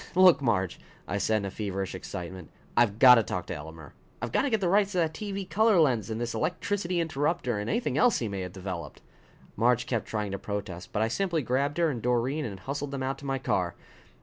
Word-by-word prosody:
"Look, 180 -5 +7
Marge!" 95 -8 0 0.3
I - - -1
said 110 -2 +1
in 100 - -4
feverish 95 -2 -3
excitement. 90 -1 -7 0.3
"I've 110 -4 +3
got 125 +1 +9
to 115 - +4
talk 90 -2 -3
to - - -5
Elmer! 80 -1 -9 0.3
I've - - -4
got - - +3
to 280 - 0
get 220 -3 +1
the 190 - 0
rights 200 +2 +3
to - - -2
that 160 -2 +1
TV 200 -2 -5
color 215 -1 +4
lens 120 - +2
and 110 0 -3
this 120 0 -2
electricity 180 - -1
interruptor 150 -6 0
and 105 - -3
anything 235 +2 0
else 245 -4 +4
he 115 - -2
may 100 -2 -4
have 90 -1 -5
developed!" 90 -5 -7 0.5
Marge 120 +2 +2
kept 115 -4 -2
trying 105 -2 -2
to 100 - -3
protest, 100 -4 -5
but 105 - +1
I - - +2
simply 170 +4 0
grabbed 140 +5 0
her 170 -2 +3
and 120 -4 -5
Doreen 125 +5 0
and 100 -5 -6
hustled 140 +5 -4
them 135 -1 -4
out 135 +1 -2
to 140 - -11
my 135 0 0
car. 90 -8 -1
120 Hz, 230 wpm, -28 LUFS, 100-165 Hz, 0.5 s, got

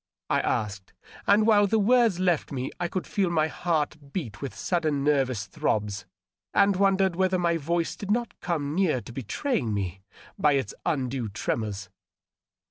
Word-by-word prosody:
I - - +4
asked, 100 -3 -2 0.3
and 210 +2 +5
while 205 -2 +5
the 220 - +2
words 225 -3 +4
left 180 -4 +1
me 130 -1 -3
I 175 - 0
could 185 +1 -3
feel 195 -3 0
my 160 -2 +2
heart 150 -4 -2
beat 120 - -5
with 140 - -5
sudden 155 -6 0
nervous 130 -7 +1
throbs, 105 +1 -2 0.5
and 200 0 +5
wondered 190 -1 +3
whether 185 0 +2
my 170 -1 +1
voice 165 +2 -1
did 200 - -7
not 235 +2 0
come 150 -5 -2
near 170 -7 +2
to 120 - -11
betraying 130 - -1
me 95 -1 -3 0.4
by 150 -1 +4
its 130 -6 -1
undue 130 -5 -1
tremors. 100 -1 -3
155 Hz, 160 wpm, -27 LUFS, 125-190 Hz, 0.5 s, and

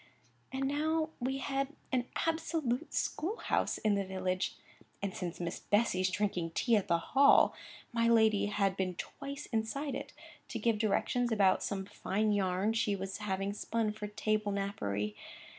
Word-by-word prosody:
And 270 0 -1
now 310 +3 +1
we 265 +2 -1
had 275 0 -1 0.2
an 250 -2 +1 0.2
absolute 320 -4 -1
school 380 +9 -1
house - - 0
in 215 -1 +2
the 200 0 +1
village; 185 0 -2 0.4
and 200 -2 -3
since 175 -2 -4
Miss 175 0 -3
Bessy's 195 -3 +2
drinking 180 -4 -1
tea 235 -3 +3
at 205 - +1
the 170 - +3
Hall, 275 +11 +5 0.4
my 230 0 +3
lady 220 -3 +4
had 200 -2 +1
been 185 -2 -1
twice 280 +9 -6
inside 255 +6 -1
it, - - -5 0.4
to 235 - -4
give 225 -1 +1
directions 235 +3 +1
about 200 -4 +4
some 195 -2 -2
fine 210 +2 0
yarn 195 +1 +1
she 225 -3 +1
was 195 +1 -5
having 195 -1 -2
spun 220 +1 -1
for 210 0 -5
table 215 0 0
napery. 105 - -2
210 Hz, 160 wpm, -33 LUFS, 195-245 Hz, 0.4 s, Hall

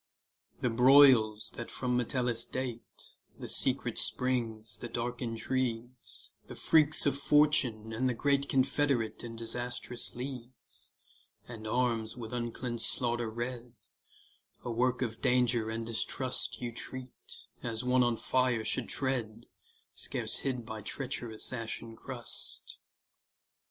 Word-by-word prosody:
The 125 - +1
broils 120 -4 +6
that 120 - -6
from 125 -1 -1
Metellus 120 -1 0
date, 125 -2 -5 0.3
The - - -7
secret - - +1
springs, 115 -4 0
the 120 - -6
dark 120 +2 -3
intrigues, 120 0 -3 0.2
The - - -8
freaks 155 -1 +3
of 140 - +3
Fortune, 135 -7 +3
and 130 +3 +1
the 125 - -1
great 140 +2 +1
Confederate 135 -3 +1
in 115 -1 -6
disastrous 120 +1 -4
leagues, 125 -1 -8 0.6
And 110 -2 -8
arms 115 -1 0
with 115 -1 -7
uncleansed 120 0 -3
slaughter 120 -2 0
red, 120 +1 -5 0.9
A 120 - -3
work 125 +2 +1
of 115 -2 -4
danger 125 -3 +2
and 115 +1 -3
distrust, 125 +3 -2
You 120 -1 -3
treat, 130 +2 -6 0.5
as 115 0 -3
one 125 0 +3
on 120 -2 +2
fire 125 -3 +1
should - - +1
tread, 120 -4 -2 0.5
Scarce - - +1
hid 125 -4 -2
by 110 -1 -6
treacherous 125 -3 -3
ashen 115 -1 -4
crust. - - -2
120 Hz, 125 wpm, -31 LUFS, 115-130 Hz, 0.9 s, broils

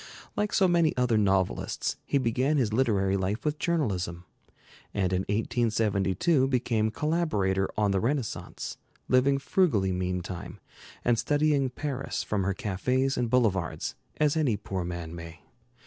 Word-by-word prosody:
Like 210 0 0
so 190 - +4
many 170 -4 +2
other 125 -2 +2
novelists, 95 -3 +1
he - - +2
began 130 +4 +1
his 115 -6 +1
literary 100 -6 +2
life 95 +6 -2
with 150 0 -1
journalism; 95 - -1 0.7
and 95 -2 +1
in 90 - +2
1872 115 - +1
became 120 -4 +1
collaborator 105 - 0
on 105 -2 +2
the 95 - +2
Renaissance, 125 +1 -3 0.3
living 130 +2 +4
frugally 135 - +2
meantime, 90 0 -4 0.5
and 120 -2 +3
studying 145 -2 +2
Paris 135 0 -3
from 105 -2 -1
her 100 -1 0
cafés 125 +8 0
and 120 -2 -1
boulevards 105 -9 +1 0.2
as 150 -1 +2
any 140 -9 +2
poor 95 -2 -4
man 85 -2 -5
may. 85 0 -9
115 Hz, 135 wpm, -28 LUFS, 95-135 Hz, 0.7 s, so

